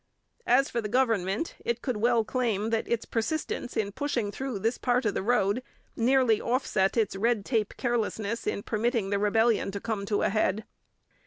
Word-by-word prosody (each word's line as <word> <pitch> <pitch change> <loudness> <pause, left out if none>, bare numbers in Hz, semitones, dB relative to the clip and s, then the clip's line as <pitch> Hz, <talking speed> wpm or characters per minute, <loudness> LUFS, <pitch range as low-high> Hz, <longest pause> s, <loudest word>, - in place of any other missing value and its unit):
As 270 +3 +4
for 235 - -2
the 210 - -4
government, 225 - +1
it 235 0 -2
could 250 -5 -1
well 235 +1 +3
claim 225 -3 -1
that 225 -1 0
its 235 -1 -1
persistence 245 +1 -2
in 205 -2 0
pushing 240 -3 -2
through 260 0 -4
this 225 +5 -1
part 250 0 +1
of 210 - +1
the - - -1
road 210 +1 +1 0.3
nearly 245 -2 +3
offset 235 -5 +1
its 215 -4 +1
red 220 0 +1
tape 220 -5 0
carelessness 230 -2 -2
in 200 - -1
permitting 225 -2 0
the 200 - +1
rebellion 220 +1 +2
to 200 +1 -4
come 205 -2 -3
to 205 -1 +1
a - - +3
head. 215 0 0
225 Hz, 180 wpm, -28 LUFS, 205-245 Hz, 0.3 s, As